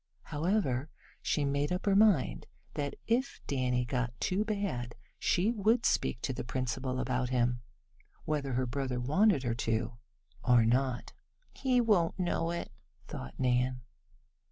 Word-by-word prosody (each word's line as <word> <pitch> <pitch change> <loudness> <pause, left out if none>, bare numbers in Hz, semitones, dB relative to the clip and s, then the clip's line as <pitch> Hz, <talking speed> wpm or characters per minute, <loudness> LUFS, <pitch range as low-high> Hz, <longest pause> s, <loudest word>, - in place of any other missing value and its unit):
However, 150 - 0 0.3
she 150 - 0
made 140 +2 0
up 180 +1 -2
her 200 -1 +3
mind 200 -10 +3 0.3
that 145 -1 -3
if 245 +4 0
Danny 125 -2 0
got 125 -1 -2
too 190 +3 +1
bad 200 - -2 0.2
she 190 +6 +2
would 225 +2 +2
speak 120 - +1
to 130 - -1
the - - -4
principal 130 +1 -2
about 125 0 0
him, 120 -1 +1 0.6
whether 145 -3 -1
her 130 +1 +1
brother 130 0 -2
wanted 155 - +3
her 120 -2 0
to 115 0 -2 0.4
or 120 -3 +5
not. 125 +1 0 0.4
"He 255 -2 +2
won't 205 -8 +3
know 175 -2 0
it," 170 0 -4 0.4
thought 65 - -7
Nan. 125 0 +1
135 Hz, 140 wpm, -31 LUFS, 125-185 Hz, 0.6 s, or